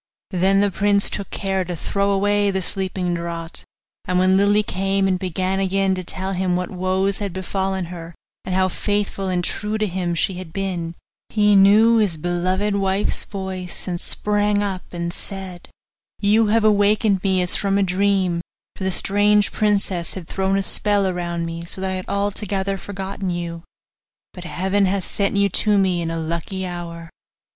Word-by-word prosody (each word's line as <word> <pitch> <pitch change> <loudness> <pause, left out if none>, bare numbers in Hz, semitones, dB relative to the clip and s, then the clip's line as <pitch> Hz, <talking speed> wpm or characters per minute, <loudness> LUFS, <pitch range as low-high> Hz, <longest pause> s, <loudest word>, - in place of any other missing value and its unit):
Then 190 +1 +3
the 205 -1 +2
prince 200 +2 +2
took 200 - -4
care 195 -2 -1
to 175 0 -5
throw 200 +5 -1
away 205 +1 +2
the 190 -1 -1
sleeping 185 -2 -1
draught; 170 -1 -4 0.4
and 180 - 0
when 185 +1 +4
Lily 205 +2 +4
came 195 0 0
and 185 -1 +1
began 185 +1 -1
again 195 0 +1
to 185 -1 -3
tell 190 +2 -4
him 180 -1 0
what 180 0 -2
woes 190 +1 0
had 200 -4 -3
befallen 190 0 -2
her, 165 -1 -9 0.3
and 185 - -3
how 185 0 +3
faithful 200 0 -2
and 180 -1 0
true 210 +4 -2
to 215 - +1
him 180 -3 -2
she 190 - 0
had 180 -3 -9
been, 175 -4 -3 0.3
he 210 -1 +3
knew 210 +4 +6
his 200 -7 +1
beloved 185 +5 0
wife's 195 0 0
voice, 190 -3 -6
and 175 -2 -3
sprang 205 0 +1
up, 190 -2 -4
and 170 -1 -3
said, 190 -3 -3 0.5
'You 215 +2 +3
have 220 +1 +3
awakened 205 -1 +3
me 190 -2 +2
as 180 - 0
from 200 -1 +1
a 200 - +3
dream, 185 -2 +1 0.3
for - - -6
the 190 - +1
strange 205 +2 +2
princess 200 -5 +1
had 180 -4 -7
thrown 195 0 0
a 195 - 0
spell 205 0 +3
around 175 -2 -2
me, 165 0 -5
so 170 - 0
that 190 0 -2
I - - -1
had 185 0 -5
altogether 200 -1 -1
forgotten 195 0 -5
you; 170 -1 -4 0.7
but 180 -1 -9
Heaven 190 +3 +1
hath 190 -1 -1
sent 200 0 -1
you 200 0 +4
to 210 +3 +2
me 185 -3 +2
in 165 - -2
a 165 - -3
lucky 170 +4 -3
hour. 170 -2 -7
190 Hz, 180 wpm, -21 LUFS, 180-200 Hz, 0.7 s, knew